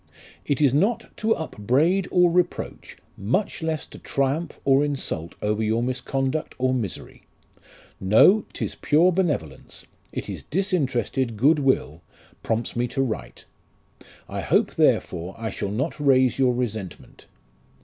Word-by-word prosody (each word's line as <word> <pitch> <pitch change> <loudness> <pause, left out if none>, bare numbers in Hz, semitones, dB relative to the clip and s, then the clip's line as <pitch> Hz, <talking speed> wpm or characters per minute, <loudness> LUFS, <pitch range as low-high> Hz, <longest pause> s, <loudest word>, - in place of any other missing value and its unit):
It 145 - 0
is 140 -4 +4
not 220 +9 0
to 225 +1 +1
upbraid 160 - +1
or 180 -1 +4
reproach, 175 0 -2 0.2
much 130 - -1
less 160 -1 -2
to - - -13
triumph 140 +4 -2
or 135 +1 +4
insult 135 - -3
over 105 +1 0
your 110 +2 +1
misconduct 135 +3 -2
or 130 0 +1
misery; 115 -8 -5 0.8
no, 110 - +5
'tis - - -4
pure 165 +5 +3
benevolence, 145 - -3 0.3
it - - -5
is - - -6
disinterested 135 - -1
good 145 +7 +4
will, 130 - 0 0.4
prompts 115 +1 -2
me 120 +1 0
to 135 - -2
write. 70 - -5 0.8
I - - -4
hope, - - +1
therefore, 90 +2 +1
I 115 -2 -4
shall 100 - -4
not 130 +10 -2
raise 130 -3 +3
your 125 -2 +3
resentment. 110 -6 -5
135 Hz, 135 wpm, -24 LUFS, 110-160 Hz, 0.8 s, no